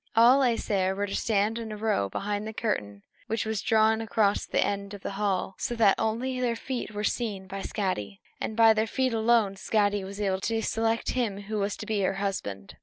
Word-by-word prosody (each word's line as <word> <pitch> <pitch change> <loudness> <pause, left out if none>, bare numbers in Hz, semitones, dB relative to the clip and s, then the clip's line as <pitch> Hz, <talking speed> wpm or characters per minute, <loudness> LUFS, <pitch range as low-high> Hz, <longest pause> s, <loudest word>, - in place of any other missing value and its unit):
All 240 +4 +7
the 265 - +4
Æsir 195 -5 0
were 200 +1 -1
to 195 - -6
stand 215 +1 +1
in 225 -1 -6
a 210 - -5
row 210 - 0
behind 205 - -3
the 220 - -5
curtain 105 - -3 0.2
which 225 0 -1
was 220 -2 -2
drawn 220 0 +3
across 215 -2 +1
the - - 0
end 200 0 -3
of 200 - -11
the - - -4
hall, 195 -1 -1
so 240 -3 -2
that 215 -4 +5
only 250 +4 -1
their 240 -2 0
feet 250 +1 -4
were 210 0 -5
seen 210 -4 -2
by 195 +1 -6
Skadi; 105 - -3 0.2
and 220 - -4
by 225 -1 +7
their 220 +1 0
feet 260 +1 0
alone 220 -3 +2
Skadi 205 -1 +1
was 195 +1 -7
to 205 +3 0
select 225 +1 0
him 215 -6 -1
who 210 +1 -3
was 200 +1 -1
to - - -7
be 215 -1 -1
her 195 0 +1
husband. 145 - -4
210 Hz, 215 wpm, -27 LUFS, 195-225 Hz, 0.2 s, All